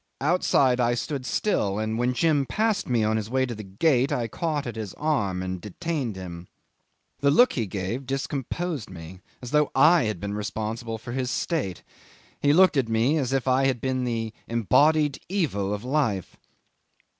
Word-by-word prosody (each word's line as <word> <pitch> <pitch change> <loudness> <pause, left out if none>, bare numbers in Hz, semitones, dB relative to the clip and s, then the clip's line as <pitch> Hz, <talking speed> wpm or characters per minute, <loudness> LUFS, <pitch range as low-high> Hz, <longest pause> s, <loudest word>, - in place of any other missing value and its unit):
Outside 140 -5 +2
I 120 0 +2
stood 130 +1 -4
still, 105 - 0
and 110 +1 -1
when 120 +2 0
Jim 145 -2 +2
passed 220 -5 0
me 120 -3 +2
on 110 +1 +1
his 110 0 -4
way 130 +1 +1
to 125 - -5
the 110 - -7
gate, 125 +7 +1
I 120 -2 0
caught 150 +4 -2
at 120 -2 -5
his 110 -4 -6
arm 100 -12 -1
and 95 -1 -4
detained 135 - -3
him. 90 -2 -8 0.7
The 140 +1 +3
look 245 - +5
he 115 -5 -1
gave 100 +8 -4
discomposed 135 - -3
me, 90 0 -10 0.2
as 125 - -6
though 150 -1 +3
I 155 +2 +6
had 110 -5 -2
been 100 +2 -4
responsible 110 +2 -4
for 115 +2 -9
his 125 0 -2
state 130 - -2 0.6
he 145 - +3
looked 175 -1 +5
at 125 -4 +1
me 115 +7 +2
as 130 -3 -1
if 135 -1 0
I 130 +1 +3
had 130 -3 0
been 130 +1 -1
the 115 -2 -2
embodied 145 +6 +3
evil 120 - -1
of 105 +1 -3
life. 125 - -1
125 Hz, 180 wpm, -25 LUFS, 105-145 Hz, 0.7 s, I